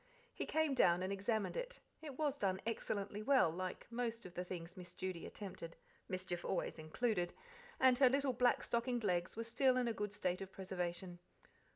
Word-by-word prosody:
He - - -3
came 315 -2 +2
down 180 -8 +4
and 190 +1 -1
examined 205 +1 0
it: - - -4 0.2
it 290 -5 -7
was 295 -2 0
done 190 -2 +1
excellently 210 -2 -2
well, 255 - +5
like 185 +2 -4
most 235 -1 -2
of 180 - -9
the 180 - -2
things 175 -1 -6
miss 180 -2 -10
Judy 185 -3 -4
attempted 185 -5 -7 0.3
mischief 185 -2 -3
always 175 - -1
included: 175 +3 0 0.5
and 260 -1 +6
her 265 -2 +8
little 275 0 +2
black 245 0 +3
stockinged 235 0 0
legs 175 -4 +1
were 230 - -1
still 255 +3 +3
in 250 -1 +2
a 230 - +1
good 210 -1 -2
state 185 -1 0
of 195 0 -6
preservation. 180 -2 -4
200 Hz, 185 wpm, -38 LUFS, 180-245 Hz, 0.5 s, her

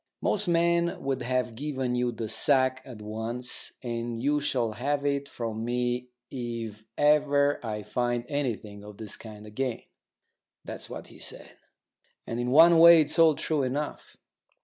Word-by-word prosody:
Most 210 -1 0
men 170 0 +2
would 135 -1 -1
have 125 -1 -1
given 130 -1 -3
you 125 0 0
the 115 -2 -5
sack 130 +3 +3
at 115 -5 -10
once, 115 +4 -3
and 120 -1 -3
you 145 +4 +1
shall 125 -5 0
have 140 +5 -2
it 140 0 -1
from 115 -2 -4
me 125 +1 -1 0.2
if 115 -4 -5
ever 145 -1 +3
I 105 -2 -4
find 120 0 -1
anything 110 -8 -3
of 105 -1 -11
this 110 -3 -7
kind 105 -2 -11
again." 120 +3 -3 0.8
That's - - -8
what - - -8
he - - -15
said. - - -7 0.7
And 115 - -4
in 120 0 -1
one 165 +5 +7
way 170 0 +9
it's 150 +2 -1
all 160 -2 +6
true 155 0 -1
enough. 140 +3 -4
125 Hz, 155 wpm, -27 LUFS, 115-145 Hz, 0.8 s, way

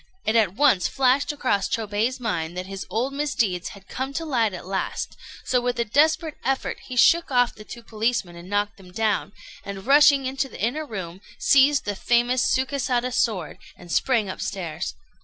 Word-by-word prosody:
It 220 - +1
at 205 -5 +3
once 260 -8 +4
flashed 270 +2 +2
across 255 -9 0
Chôbei's 225 +3 -1
mind 175 -7 -3
that 180 - -3
his 195 0 -7
old 235 +8 -1
misdeeds 235 -11 -1
had 195 - -18
come 265 +1 -4
to 325 +3 -3
light 235 -8 +1
at 180 -2 -8
last, 190 +1 -3 0.3
so 250 -1 +2
with 245 0 -1
a 235 - +1
desperate 310 +5 +2
effort 270 0 -1
he 255 - -6
shook 330 +8 +5
off 245 -2 +2
the 215 - -12
two 235 +2 -10
policemen 220 -5 -1
and 170 +2 -11
knocked 205 +1 -1
them 185 -2 -15
down, 210 -1 0 0.3
and, 195 0 -7
rushing 280 0 +6
into 270 +1 -2
the - - -11
inner 295 +8 -1
room, 190 -5 -7 0.2
seized 280 +1 +4
the 205 - -2
famous 240 +4 +2
Sukésada 255 -2 0
sword 215 -9 -1 0.2
and 175 - -12
sprang 230 -1 +2
upstairs. 185 -3 -4
235 Hz, 180 wpm, -24 LUFS, 195-265 Hz, 0.3 s, rushing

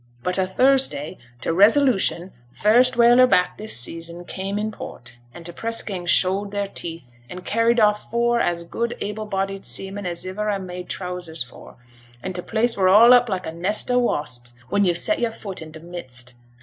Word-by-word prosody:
But 180 +1 -1
o' 185 - +1
Thursday 255 - +1 0.2
t' - - -1
Resolution, 200 - +3 0.2
first 240 - +3
whaler 240 +2 +6
back 180 -7 +2
this 215 - -3
season, 165 +6 -2
came 195 +2 -4
in 215 +1 -2
port, 120 - -10
and 170 +6 -12
t' 175 - -5
press 230 +6 -3
gang 180 -4 -6
showed 190 +3 +3
their 200 0 -2
teeth, 165 -9 -6 0.2
and 180 0 -9
carried 230 +2 +2
off 210 -1 +2
four 235 +1 +1
as 170 -5 -1
good 235 +7 -3
able 210 +1 -5
bodied 195 -1 -3
seamen 195 0 -4
as 175 0 -5
iver 210 +3 -3
I 205 - 0
made 180 -1 -8
trousers 180 -6 -4
for; 120 - -14 0.5
and 185 - -4
t' 180 - -3
place 230 +4 +1
were 190 -2 +3
all 230 +6 +8
up 245 -1 +5
like 185 -2 -3
a - - -4
nest 185 +9 -2
o' 245 - +3
wasps, 125 - -2 0.2
when 205 0 +2
yo've 175 -2 +1
set 315 - +1
your 235 - +1
foot 200 -5 -8
in 155 -1 -9
t' 160 - -11
midst. 130 -8 -9
195 Hz, 195 wpm, -22 LUFS, 175-220 Hz, 0.5 s, all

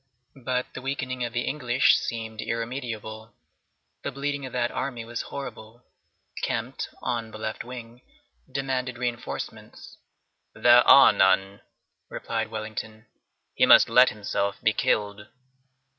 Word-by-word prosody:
But 125 +1 -2
the 130 - -7
weakening 130 -2 -3
of 120 - -3
the 120 0 -1
English 130 -3 +3
seemed 110 -2 -4
irremediable. 115 -2 -5 0.7
The - - -4
bleeding 140 0 -3
of - - -12
that 120 -1 0
army 120 -4 -4
was 120 0 -4
horrible. 120 -3 -8 0.6
Kempt, - - -3
on 115 -2 -2
the 110 - -10
left 110 0 -4
wing, 120 -1 -10 0.5
demanded 130 -2 -2
reinforcements. 120 -1 -6 0.6
"There 120 0 +7
are 135 - +9
none," 95 +1 +2 0.5
replied 115 -1 -3
Wellington; 110 0 -6 0.5
"he - - +3
must - - +8
let 125 +2 +6
himself 100 -1 -2
be 110 - +3
killed!" 105 0 -1
120 Hz, 125 wpm, -26 LUFS, 110-125 Hz, 0.7 s, are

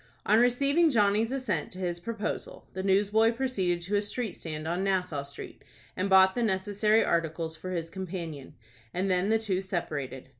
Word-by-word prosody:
On 215 +2 +5
receiving 280 +7 +3
Johnny's 215 -2 +2
assent 260 -5 -2
to - - -9
his 175 -2 -2
proposal, 215 +3 -5
the 190 - -3
newsboy 205 +4 +3
proceeded 195 -9 -1
to 200 +4 -1
a - - +2
street 210 -1 -4
stand 155 -1 -6
on 175 +3 -1
Nassau 180 -6 0
Street, 140 0 -10 0.3
and 185 +2 -1
bought 190 0 +6
the 245 - -2
necessary 210 +1 +2
articles 165 -1 -1
for 175 +4 -7
his 165 -2 -3
companion, 170 -7 -6 0.4
and 190 +2 0
then 180 +2 +2
the 225 - +4
two 200 -4 -1
separated. 145 -9 -4
190 Hz, 175 wpm, -28 LUFS, 175-220 Hz, 0.4 s, bought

